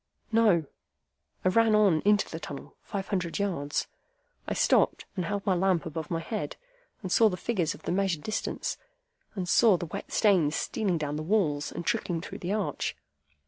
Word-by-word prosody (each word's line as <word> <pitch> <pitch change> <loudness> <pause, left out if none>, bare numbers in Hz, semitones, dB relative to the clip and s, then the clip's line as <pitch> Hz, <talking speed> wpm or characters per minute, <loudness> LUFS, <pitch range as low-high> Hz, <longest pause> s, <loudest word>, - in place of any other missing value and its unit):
"No. 210 -8 +4 0.8
I - - +5
ran 225 +2 +4
on 195 -7 +4
into 210 0 +4
the 160 - -6
tunnel, 145 -3 -8
five 195 -1 -5
hundred 180 -4 -1
yards. 170 -8 -1 0.6
I - - -2
stopped, - - +3
and 180 -3 -2
held 200 +2 -3
my 195 - +3
lamp 185 -1 +1
above 160 -1 -5
my 165 -1 -1
head, 215 +5 -4 0.5
and 185 - -4
saw 225 +2 +6
the 180 - -4
figures 180 -5 -1
of - - -16
the - - -2
measured 185 -4 0
distance, 215 - -3 0.6
and 185 -3 -3
saw 205 +1 +5
the 175 - -4
wet 160 - -7
stains 180 -8 +3
stealing 195 -6 -1
down 150 -1 -2
the - - -3
walls 155 -5 +1
and 170 - -6
trickling 205 -8 0
through 165 - -8
the 180 - -3
arch. 210 -2 -1
185 Hz, 185 wpm, -28 LUFS, 165-205 Hz, 0.8 s, saw